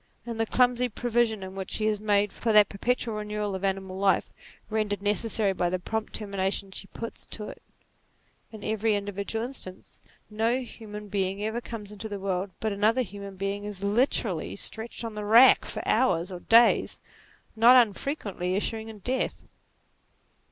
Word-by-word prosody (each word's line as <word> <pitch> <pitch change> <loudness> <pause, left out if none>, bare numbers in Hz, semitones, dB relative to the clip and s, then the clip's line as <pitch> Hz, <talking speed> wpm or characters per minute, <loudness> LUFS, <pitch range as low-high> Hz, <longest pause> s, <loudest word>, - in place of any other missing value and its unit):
In 235 -1 -5
the 225 - +1
clumsy 250 +1 +3
provision 220 -4 0
which 190 -1 -5
she 215 - -1
has 210 -1 +1
made 205 -1 +2
for 230 - -1
that 210 -1 +7
perpetual 230 +1 -1
renewal 210 -1 -3
of 190 0 -5
animal 190 -1 -2
life, 195 -2 +2 0.4
rendered 210 -2 -1
necessary 210 -1 +1
by 175 -1 0
the 185 - 0
prompt 220 +4 -3
termina 200 -2 -1
tion 195 -1 -4
she 195 - -6
puts 230 +3 -7
to 210 -1 -6
it - - -11 0.9
in 215 -2 -10
every 215 0 +1
individual 205 +3 -3
instance, 215 -8 -8 0.3
no 225 +4 0
human 210 -3 -9
being 195 0 -1
ever 220 +3 -2
comes 210 -4 -8
into 210 +1 -7
the 205 -1 -4
world 190 0 -2
but 220 -2 -1
another 220 +5 +2
human 200 -1 -8
being 195 +1 -3
is 205 -2 -6
literally 225 +7 +1
stretched 230 +1 -2
on 225 - -5
the 210 0 -5
rack 230 +5 +7
for - - -5
hours 180 -8 +2
or 180 - -6
days, 230 +5 +4 0.6
not 235 +3 +7
unfrequently 205 - +1
issuing 220 +2 -2
in 220 - -9
death. 260 +1 -1
210 Hz, 165 wpm, -27 LUFS, 200-225 Hz, 0.9 s, that